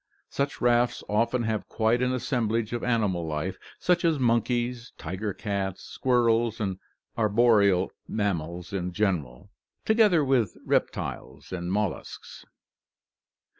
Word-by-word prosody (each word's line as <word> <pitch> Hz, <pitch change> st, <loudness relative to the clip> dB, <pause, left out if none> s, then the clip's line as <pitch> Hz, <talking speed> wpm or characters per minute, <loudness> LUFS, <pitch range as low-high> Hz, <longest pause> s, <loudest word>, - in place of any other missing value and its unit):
Such 140 Hz, 0 st, -2 dB
rafts 120 Hz, -1 st, +2 dB
often 115 Hz, +3 st, +1 dB
have 110 Hz, -2 st, -2 dB
quite 115 Hz, +2 st, +1 dB
an 125 Hz, 0 st, +2 dB
assemblage 115 Hz, -3 st, -1 dB
of 120 Hz, -, -3 dB
animal 105 Hz, -8 st, +1 dB
life, 80 Hz, +5 st, -3 dB, 0.2 s
such 180 Hz, -1 st, +1 dB
as 165 Hz, -3 st, +3 dB
monkeys, 120 Hz, 0 st, 0 dB
tiger 100 Hz, +3 st, -4 dB
cats, 100 Hz, -2 st, -3 dB
squirrels, 120 Hz, -2 st, +1 dB
and 95 Hz, -3 st, -2 dB, 0.4 s
arboreal 105 Hz, -4 st, +3 dB, 0.2 s
mammals 90 Hz, -3 st, -2 dB
in 90 Hz, -2 st, -2 dB
general, 85 Hz, -12 st, -2 dB, 0.3 s
together 210 Hz, -9 st, +4 dB
with 125 Hz, -7 st, +1 dB
reptiles 70 Hz, +3 st, -2 dB
and 90 Hz, -1 st, -3 dB
molluscs. 105 Hz, -2 st, -4 dB
110 Hz, 115 wpm, -27 LUFS, 95-120 Hz, 0.4 s, together